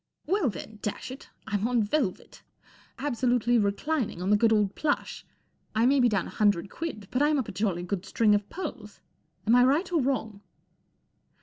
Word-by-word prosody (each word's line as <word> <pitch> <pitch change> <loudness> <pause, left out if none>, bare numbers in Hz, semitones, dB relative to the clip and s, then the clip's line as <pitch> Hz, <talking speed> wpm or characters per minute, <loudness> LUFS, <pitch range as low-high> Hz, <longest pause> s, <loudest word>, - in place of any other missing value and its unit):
" - - -48
Well, 370 - +1
then, 215 +1 -8
dash 210 +4 -4
it, 265 - -10 0.2
I'm 210 0 -1
on 240 -2 +2
velvet. 210 -2 -2 0.6
Absolutely 245 -3 +1
reclining 220 - -1
on 185 +3 -1
the - - +6
good 225 +2 +3
old 210 -3 +2
plush! 295 -2 -2 0.5
I 225 +2 +3
may 275 +2 +4
be 245 -1 +5
down 200 -5 0
a - - -8
hundred 200 -3 +1
quid, 260 -12 -5
but 255 - 0
I'm 300 0 +3
up 260 - -1
a - - -4
jolly 185 -3 -1
good 180 0 -3
string 210 +2 +2
of 205 0 0
pearls. 265 - -7 0.5
Am 220 - +3
I 245 - +6
right 300 +9 +2
or 325 - +3
wrong 225 -6 -2
225 Hz, 190 wpm, -27 LUFS, 205-270 Hz, 0.6 s, the